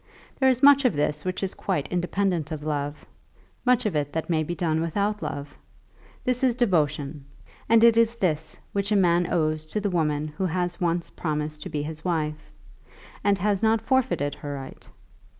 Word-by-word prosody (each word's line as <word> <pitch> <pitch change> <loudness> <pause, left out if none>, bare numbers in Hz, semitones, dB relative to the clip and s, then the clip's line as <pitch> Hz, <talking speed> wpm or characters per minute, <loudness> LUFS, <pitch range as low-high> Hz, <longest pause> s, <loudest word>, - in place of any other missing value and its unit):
There 265 -1 +5
is 255 +1 +1
much 280 0 +8
of 250 - +2
this 150 +1 0
which 185 +1 -3
is 190 - -1
quite 185 -8 -2
independent 180 -2 0
of 155 -2 -5
love, 145 -1 -3 0.6
much 250 -3 +3
of 205 -6 0
it 145 -1 0
that 160 +1 -2
may 160 -1 +2
be 170 +3 -3
done 160 -3 0
without 205 +6 -1
love. 145 0 -5 0.7
This 250 +1 0
is 250 -3 +3
devotion, 150 - 0 0.5
and 230 0 +6
it 235 -1 +7
is 230 0 +3
this 165 -9 -1 0.2
which 200 +1 -1
a - - +4
man 175 -2 +3
owes 155 -2 +1
to 210 - -2
the 205 -1 -1
woman 155 -3 0
who 185 +5 -2
has 175 +1 -2
once 170 0 0
promised 150 -1 -3
to - - -6
be 145 -1 -2
his 155 +1 -7
wife, 155 -4 -2 0.7
and 200 -1 +3
has 200 +1 0
not 225 0 +3
forfeited 210 - +1
her 145 -1 -6
right. 135 -1 -9
175 Hz, 185 wpm, -25 LUFS, 150-205 Hz, 0.7 s, much